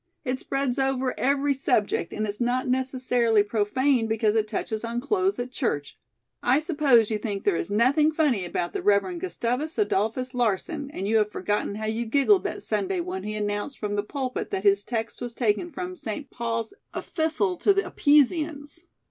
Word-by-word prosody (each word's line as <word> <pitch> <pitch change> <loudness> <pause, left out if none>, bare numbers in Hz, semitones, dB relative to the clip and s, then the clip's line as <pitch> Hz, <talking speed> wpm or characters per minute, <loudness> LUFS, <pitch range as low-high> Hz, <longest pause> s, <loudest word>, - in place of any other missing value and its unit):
It 255 0 -1
spreads 275 -1 -1
over 265 -1 0
every 280 +1 +2
subject 245 -10 0
and 215 - -2
it's 210 +2 -4
not 250 +2 +1
necessarily 250 -4 +2
profane 225 +4 +1
because 220 -1 +1
it 215 -1 +2
touches 220 +1 -3
on 235 +1 -2
clothes 375 - 0
at 245 +1 -4
church. 145 - -2 0.5
I 250 +2 +3
suppose 290 - +3
you 215 - 0
think 205 -2 -4
there 205 - +2
is 165 - -2
nothing 260 +9 +3
funny 295 - +1
about 175 0 -3
the - - -2
Reverend 195 -4 +2
Gustavus 245 - -2
Adolphus 250 - 0
Larsen, 250 - -1
and 195 -8 -4
you 220 +1 +3
have 210 -1 +1
forgotten 205 +1 -1
how 215 +1 -4
you 225 +2 -2
giggled 285 - +3
that - - -3
Sunday 385 -1 -1
when 365 +2 -4
he 215 0 -4
announced 205 +5 -3
from 205 -1 -3
the 205 - +1
pulpit 255 +4 -4
that 190 - -3
his 200 0 +4
text 225 0 -4
was 240 -1 -5
taken 235 +8 0
from 365 +1 -5
St. 280 -2 -6
Paul's 230 -2 -3 0.2
'Efistle 245 - -1
to - - +4
the 395 0 +2
Epeesians.'" 300 +2 +1
245 Hz, 180 wpm, -26 LUFS, 210-285 Hz, 0.5 s, his